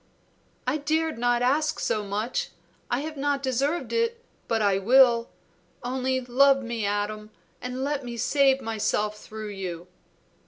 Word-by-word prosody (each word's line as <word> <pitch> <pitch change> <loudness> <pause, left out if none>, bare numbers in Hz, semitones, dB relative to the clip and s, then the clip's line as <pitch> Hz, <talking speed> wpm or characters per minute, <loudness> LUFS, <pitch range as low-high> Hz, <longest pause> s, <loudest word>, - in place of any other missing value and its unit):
"I 255 +4 +1
dared 315 -2 -1
not 245 0 +2
ask 300 +5 +1
so 215 - 0
much! 210 +4 -2 0.4
I 245 +3 0
have 310 0 -6
not 280 0 0
deserved 275 +6 -1
it, 465 +1 0 0.2
but 225 - +1
I 200 -2 +2
will. 240 +2 +5 0.5
Only 260 +1 0
love 270 +2 +4
me, 235 -3 -2
Adam, 210 +1 -2 0.3
and 250 +1 -4
let 285 0 -1
me 240 -1 -6
save 270 +3 +3
myself 210 -1 -1
through 215 -1 -7
you." 180 -4 -6
250 Hz, 145 wpm, -26 LUFS, 215-280 Hz, 0.5 s, will